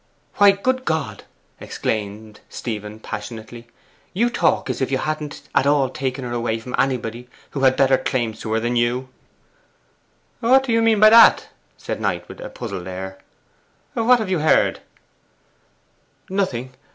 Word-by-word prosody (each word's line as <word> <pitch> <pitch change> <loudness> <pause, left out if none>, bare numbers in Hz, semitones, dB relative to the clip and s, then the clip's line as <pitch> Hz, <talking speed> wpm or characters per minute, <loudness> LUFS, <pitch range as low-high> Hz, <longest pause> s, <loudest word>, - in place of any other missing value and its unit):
'Why, 205 -1 +7
good 255 +6 -1
God!' 160 - -3 0.3
exclaimed 105 0 -4
Stephen 105 -2 -6
passionately, 110 +2 -8 0.5
'you 235 +5 +2
talk - - +1
as 130 -1 -3
if 130 - 0
you 135 - +1
hadn't 155 0 -4
at 140 - +3
all 140 -2 +3
taken 130 0 -3
her 120 - -5
away 120 -1 -1
from 125 +2 -9
anybody 125 -2 -2 0.2
who 140 - -4
had 130 -1 +4
better 135 -1 +4
claims 115 -4 -2
to 110 - -5
her 110 - +2
than 120 +2 -1
you!' 120 +2 0 1.3
'What 260 +3 +4
do 260 - -3
you 230 0 +3
mean 225 -2 +3
by 215 +1 +8
that?' 230 0 +7 0.3
said - - -5
Knight, - - -2
with - - -11
a - - -7
puzzled 90 0 -6
air. 95 +1 -7 0.7
'What 240 +2 +4
have 215 -5 -3
you 180 - +1
heard?' 155 +1 +3 1.5
'Nothing. 130 -11 -2
130 Hz, 155 wpm, -21 LUFS, 115-190 Hz, 1.5 s, by